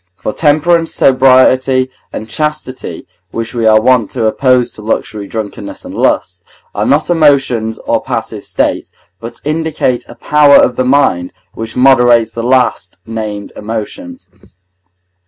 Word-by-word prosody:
For 105 - -5
temperance, 165 +2 +2
sobriety, 130 0 +3 0.2
and 110 - -7
chastity, 150 +1 -4 0.2
which 115 0 -5
we 115 -2 0
are 110 0 +5
wont 120 -2 +2
to 120 -3 -1
oppose 125 +2 +2
to - - -11
luxury, 105 -1 -3
drunkenness, 110 -1 -7
and - - -8
lust, - - -1 0.3
are - - -1
not 150 +5 +1
emotions 135 -8 +2
or - - 0
passive - - -4
states, - - -2 0.3
but 115 +1 -9
indicate 150 -5 -1
a - - -12
power 150 -1 +4
of 125 - +4
the 130 - -1
mind 125 -10 +1 0.2
which 115 0 -7
moderates 120 -3 +4
the 115 - -5
last 125 -6 0
named 110 -2 -6
emotions. 115 - -7
125 Hz, 140 wpm, -13 LUFS, 110-140 Hz, 0.3 s, are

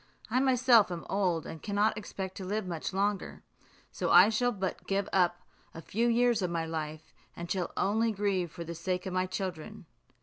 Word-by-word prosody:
I 250 - +3
myself 250 -6 +4
am 170 -1 -5
old, 185 -5 0
and 160 - -8
cannot 210 +1 +1
expect 190 -2 -6
to 195 - -6
live 205 +2 -2
much 170 0 -4
longer; 200 +1 -2 0.5
so - - -2
I 190 +4 +8
shall 245 +3 +1
but 190 -4 -4
give 200 0 0
up 175 -2 +2 0.3
a 165 - -7
few 230 +4 0
years 240 -1 +3
of 180 - 0
my 165 -1 -2
life, 155 -1 -5 0.2
and 170 0 -6
shall 185 -3 -1
only 225 +3 +2
grieve 195 -5 -1
for 170 - -7
the 170 0 -6
sake 180 +3 -3
of 190 - -4
my 185 0 0
children." 190 +2 -5
190 Hz, 195 wpm, -30 LUFS, 175-215 Hz, 0.5 s, I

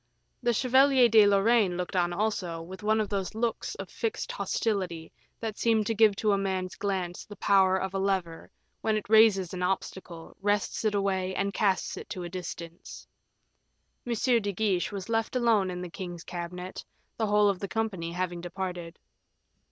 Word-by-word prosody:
The 240 -1 +2
Chevalier 260 +2 +5
de 220 -2 +6
Lorraine 200 -2 +3
looked 180 +1 -4
on 175 -1 +2
also, 185 -3 -2
with 180 +4 -9
one 215 +1 +2
of 215 - 0
those 200 0 -3
looks 230 0 -2
of - - -7
fixed 455 +1 -3
hostility 190 - -2 0.3
that 220 -2 -5
seemed 225 -2 +2
to 225 - 0
give 215 -2 +5
to 210 +1 +1
a 200 - +2
man's 190 -2 -2
glance 185 -3 -3
the 205 - -11
power 190 -1 +4
of 190 0 -3
a 195 - -1
lever 190 -4 -2 0.3
when 220 -1 +1
it 210 - -5
raises 215 -5 +5
an 180 - -4
obstacle, 180 -2 -4
wrests 205 +1 0
it 210 -1 +2
away, 190 -2 0
and 200 0 -1
casts 195 -4 0
it - - -9
to 180 - -5
a 175 - -5
distance. 170 -1 -8 1.0
M. 240 - -2
de 230 -3 +2
Guiche 195 -2 0
was 195 -2 -6
left 225 +1 -1
alone 225 -6 +3
in 180 0 -5
the - - -5
king's 175 -2 -7
cabinet, 180 +1 -6 0.3
the 220 - 0
whole 210 0 +4
of 195 -2 +1
the 200 - -4
company 190 -4 -2
having 175 -1 -3
departed. 175 -1 -5
195 Hz, 180 wpm, -28 LUFS, 180-215 Hz, 1.0 s, de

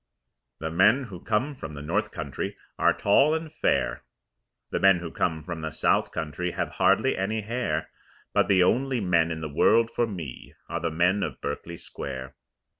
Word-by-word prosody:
The 80 0 -4
men 105 +11 +4
who 100 -8 -8
come 120 +7 0
from 75 - -8
the 70 - -7
north - - 0
country - - -5 0.2
Are - - +5
tall 135 +10 +4
and 160 - -2
very 160 - -11
fair, - - 0 0.7
The - - 0
men 95 -2 +6
who 85 -2 -6
come 80 -3 -1
from 85 0 -5
the 80 - -3
south - - +1
country 80 +3 -3
Have - - -2
hardly - - +3
any 105 +4 -1
hair, 105 -8 -2 0.4
But - - +3
the 95 -2 +5
only 130 +7 +2
men 85 -5 +2
in 80 -1 -4
the 80 - -3
world 115 +10 +3
for 120 - +1
me 85 - -7
Are 85 - -3
the 85 0 -1
men 90 +5 +2
of - - -3
Berkeley 85 +4 -5
Square. 65 -4 -7
90 Hz, 190 wpm, -26 LUFS, 80-110 Hz, 0.7 s, men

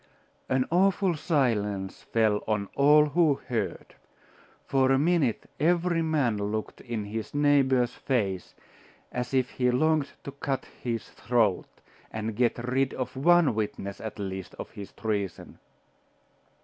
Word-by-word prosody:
An 130 -1 +2
awful 190 +1 +3
silence 105 - 0
fell 110 -2 +1
on 105 -2 -1
all 150 +2 +6
who 160 -2 +3
heard. 115 -7 -4 0.7
For 135 -1 +2
a 135 - +5
minute 150 -5 +1
every 170 +2 +2
man 145 -9 +1
looked 110 0 -4
in 115 -4 -4
his 110 +4 -5
neighbour's 135 -4 +3
face 100 -9 -2 0.6
as 125 0 -3
if 130 -1 +1
he 125 -1 +1
longed 150 +3 +1
to 140 - -6
cut 135 -1 -3 0.2
his 115 -2 -3
throat, 115 -6 +1 0.4
and 110 0 -4
get 120 +1 +2
rid 130 +1 +1
of 130 - -4
one 170 +1 +4
witness, 105 -2 -4
at 110 - -6
least, 95 -3 -5
of - - -8
his 100 -1 -9
treason. 100 -5 -4
125 Hz, 135 wpm, -27 LUFS, 110-145 Hz, 0.7 s, all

